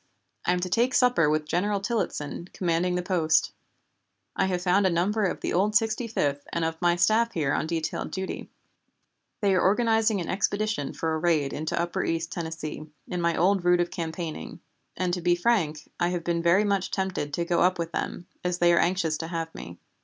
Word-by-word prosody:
I 180 Hz, -, +4 dB
am 180 Hz, -, 0 dB
to 185 Hz, -, -1 dB
take 235 Hz, +8 st, +1 dB
supper 245 Hz, -, +4 dB
with 155 Hz, 0 st, +1 dB
General 200 Hz, +6 st, 0 dB
Tillottson, 195 Hz, -6 st, -3 dB
commanding 180 Hz, 0 st, 0 dB
the 180 Hz, -, -1 dB
post. 170 Hz, -4 st, +2 dB, 0.8 s
I -, -, +2 dB
have 180 Hz, -1 st, -1 dB
found 190 Hz, +2 st, +3 dB
a -, -, +3 dB
number 195 Hz, +5 st, +1 dB
of 185 Hz, -, -2 dB
the -, -, -2 dB
old 205 Hz, +4 st, +2 dB
Sixty 225 Hz, +1 st, +2 dB
fifth 145 Hz, -10 st, -1 dB
and 170 Hz, -1 st, 0 dB
of 160 Hz, +1 st, -3 dB
my 175 Hz, -1 st, +3 dB
staff 220 Hz, +7 st, +3 dB
here 150 Hz, -5 st, 0 dB
on -, -, -1 dB
detailed 160 Hz, -1 st, -2 dB
duty. 190 Hz, 0 st, -5 dB, 0.9 s
"They 200 Hz, -2 st, +3 dB
are 185 Hz, -, +3 dB
organizing 220 Hz, +1 st, +3 dB
an 170 Hz, -, -4 dB
expedition 205 Hz, -5 st, -1 dB
for 160 Hz, -1 st, -2 dB
a 160 Hz, -, -1 dB
raid 155 Hz, -4 st, +1 dB
into 155 Hz, +2 st, -2 dB
upper 170 Hz, 0 st, -1 dB
East 165 Hz, 0 st, -2 dB
Tennessee, 160 Hz, -2 st, -5 dB, 0.2 s
in 180 Hz, -1 st, -3 dB
my 170 Hz, -1 st, +1 dB
old 190 Hz, +1 st, +3 dB
route 175 Hz, 0 st, +4 dB
of 175 Hz, 0 st, 0 dB
campaigning, 165 Hz, -1 st, -5 dB, 0.4 s
and, 180 Hz, -1 st, 0 dB
to 180 Hz, -, -1 dB
be 175 Hz, 0 st, +3 dB
frank, 175 Hz, -6 st, 0 dB
I 175 Hz, -, +2 dB
have 175 Hz, -1 st, -2 dB
been 170 Hz, 0 st, 0 dB
very 170 Hz, +4 st, +4 dB
much 200 Hz, -2 st, 0 dB
tempted 190 Hz, -6 st, -2 dB
to 170 Hz, -, -1 dB
go 170 Hz, 0 st, +1 dB
up 185 Hz, +1 st, +3 dB
with 170 Hz, -1 st, -3 dB
them, 175 Hz, -, -4 dB, 0.2 s
as 180 Hz, 0 st, -1 dB
they 175 Hz, -1 st, +4 dB
are 170 Hz, -, +4 dB
anxious 170 Hz, -4 st, +1 dB
to 165 Hz, -, -4 dB
have 165 Hz, -1 st, -4 dB
me. 85 Hz, 0 st, -9 dB
175 Hz, 205 wpm, -26 LUFS, 165-195 Hz, 0.9 s, I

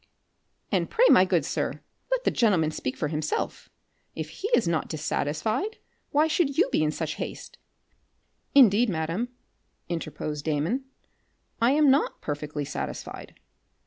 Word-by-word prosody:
"And -, -, +1 dB
pray, 475 Hz, +2 st, +4 dB
my 185 Hz, -, +7 dB
good 175 Hz, -6 st, +1 dB
sir, -, -, -2 dB, 0.3 s
let -, -, +1 dB
the -, -, +2 dB
gentleman 185 Hz, -10 st, +2 dB
speak 125 Hz, -4 st, -4 dB
for 150 Hz, -, -1 dB
himself. 155 Hz, 0 st, -3 dB, 0.5 s
If -, -, -4 dB
he 405 Hz, -, -4 dB
is 200 Hz, -, +1 dB
not 165 Hz, -2 st, 0 dB
dissatisfied, 160 Hz, -, -1 dB, 0.3 s
why 300 Hz, +2 st, +3 dB
should 305 Hz, -3 st, +1 dB
you 360 Hz, -, +5 dB
be -, -, +2 dB
in 155 Hz, -, +2 dB
such 155 Hz, -, -3 dB
haste?" -, -, -7 dB, 1.0 s
"Indeed, 240 Hz, -3 st, +6 dB
madam," 170 Hz, +7 st, -2 dB, 0.6 s
interposed 155 Hz, -3 st, -4 dB
Damon, 160 Hz, -, -1 dB, 0.8 s
"I 240 Hz, +4 st, +5 dB
am 295 Hz, -2 st, +5 dB
not 280 Hz, +3 st, +1 dB
perfectly 145 Hz, 0 st, -4 dB
satisfied. -, -, -6 dB
175 Hz, 140 wpm, -26 LUFS, -, 1.0 s, my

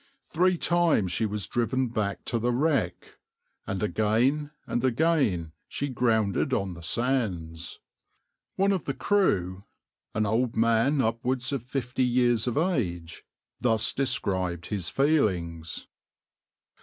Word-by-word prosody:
Three 180 Hz, +2 st, +2 dB
times 170 Hz, -, +2 dB
she 110 Hz, -, +1 dB
was 105 Hz, 0 st, -3 dB
driven 125 Hz, +1 st, 0 dB
back 105 Hz, -4 st, -2 dB
to 115 Hz, -, -1 dB
the 120 Hz, +2 st, +1 dB
wreck, 130 Hz, -, -1 dB, 0.5 s
and 100 Hz, -1 st, -2 dB
again 115 Hz, +8 st, +1 dB, 0.2 s
and 120 Hz, -, -2 dB
again 130 Hz, -, +1 dB, 0.2 s
she 140 Hz, -, -3 dB
grounded 115 Hz, 0 st, +1 dB
on 95 Hz, -5 st, -1 dB
the 85 Hz, -, -10 dB
sands.\par 90 Hz, -6 st, -2 dB, 0.8 s
One 200 Hz, -, +4 dB
of 190 Hz, -7 st, -1 dB
the 135 Hz, -, -2 dB
crew, 95 Hz, -, +1 dB, 0.5 s
an 110 Hz, 0 st, +1 dB
old 115 Hz, +3 st, 0 dB
man 115 Hz, +5 st, +3 dB
upwards 125 Hz, +3 st, -1 dB
of 135 Hz, -, -1 dB
fifty 125 Hz, +1 st, -3 dB
years 120 Hz, -2 st, +2 dB
of 120 Hz, -, -1 dB
age, 90 Hz, -, -1 dB, 0.4 s
thus 115 Hz, -1 st, +2 dB
described 95 Hz, -9 st, -1 dB
his 100 Hz, -5 st, -2 dB
feelings. 90 Hz, -, 0 dB
115 Hz, 125 wpm, -27 LUFS, 100-135 Hz, 0.8 s, One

